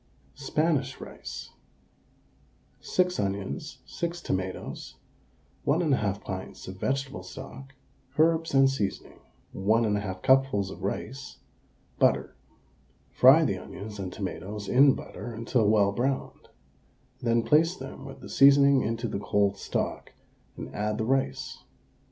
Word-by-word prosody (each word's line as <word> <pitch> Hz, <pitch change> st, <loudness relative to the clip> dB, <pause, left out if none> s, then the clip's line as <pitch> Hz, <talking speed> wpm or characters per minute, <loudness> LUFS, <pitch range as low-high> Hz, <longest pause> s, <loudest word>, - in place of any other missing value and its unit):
SPANISH 145 Hz, -1 st, 0 dB
RICE. -, -, -8 dB, 1.3 s
6 180 Hz, 0 st, 0 dB
onions, 100 Hz, -, -3 dB
6 170 Hz, 0 st, -4 dB
tomatoes, 95 Hz, -, -4 dB, 0.7 s
1 145 Hz, +4 st, +2 dB
1/2 110 Hz, -, 0 dB
pints 95 Hz, -1 st, -7 dB
of 95 Hz, 0 st, -7 dB
vegetable 135 Hz, +3 st, -2 dB
stock, 135 Hz, 0 st, -10 dB, 0.4 s
herbs 165 Hz, -1 st, +3 dB
and 135 Hz, 0 st, +7 dB
seasoning, 135 Hz, -7 st, -3 dB, 0.3 s
1 110 Hz, +4 st, +2 dB
1/2 100 Hz, -3 st, -2 dB
cupfuls 130 Hz, -7 st, +3 dB
of -, -, -10 dB
rice, 105 Hz, -, -5 dB, 0.6 s
butter. -, -, +2 dB, 0.8 s
Fry -, -, +7 dB
the -, -, -1 dB
onions 105 Hz, 0 st, -9 dB
and 95 Hz, -2 st, -4 dB
tomatoes 100 Hz, +1 st, -5 dB
in 135 Hz, +2 st, +6 dB
butter 120 Hz, -, -8 dB
until 115 Hz, -1 st, +1 dB
well 105 Hz, -2 st, +4 dB
browned, 130 Hz, +6 st, -3 dB, 0.7 s
then 115 Hz, -1 st, +2 dB
place 165 Hz, +6 st, +3 dB
them -, -, -9 dB
with -, -, -10 dB
the -, -, -10 dB
seasoning 140 Hz, 0 st, +6 dB
into 115 Hz, +2 st, -2 dB
the 100 Hz, -, -3 dB
cold 100 Hz, 0 st, +1 dB
stock, -, -, -3 dB, 0.4 s
and -, -, -7 dB
add 105 Hz, +1 st, -1 dB
the 110 Hz, -, -1 dB
rice. 130 Hz, 0 st, -1 dB
120 Hz, 120 wpm, -28 LUFS, 100-135 Hz, 1.3 s, and